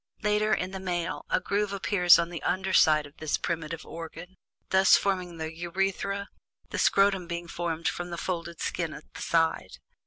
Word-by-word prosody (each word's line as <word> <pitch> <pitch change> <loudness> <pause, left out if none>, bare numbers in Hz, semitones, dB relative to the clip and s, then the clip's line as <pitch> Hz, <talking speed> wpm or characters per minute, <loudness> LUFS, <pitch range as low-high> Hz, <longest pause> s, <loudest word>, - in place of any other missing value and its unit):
Later, 210 0 +2
in 185 -3 0
the 190 - -5
male, 175 -1 -3
a - - +2
groove 205 0 -1
appears 195 -3 +5
on 170 0 -1
the 170 - -5
under 190 +1 -1
side 155 -3 +5
of 145 +1 -14
this 155 -1 -1
primitive 165 -1 -4
organ, 165 +2 -9 0.4
thus 190 0 +6
forming 185 -3 -2
the 160 0 -5
urethra, 195 +3 -2 0.4
the - - -2
scrotum 195 -3 +3
being 170 0 -4
formed 170 -1 -3
from 175 0 -2
the 170 - -5
folded 170 -2 -4
skin 165 -3 -2
at - - -14
the - - -9
side. 165 - 0
175 Hz, 180 wpm, -28 LUFS, 165-190 Hz, 0.4 s, thus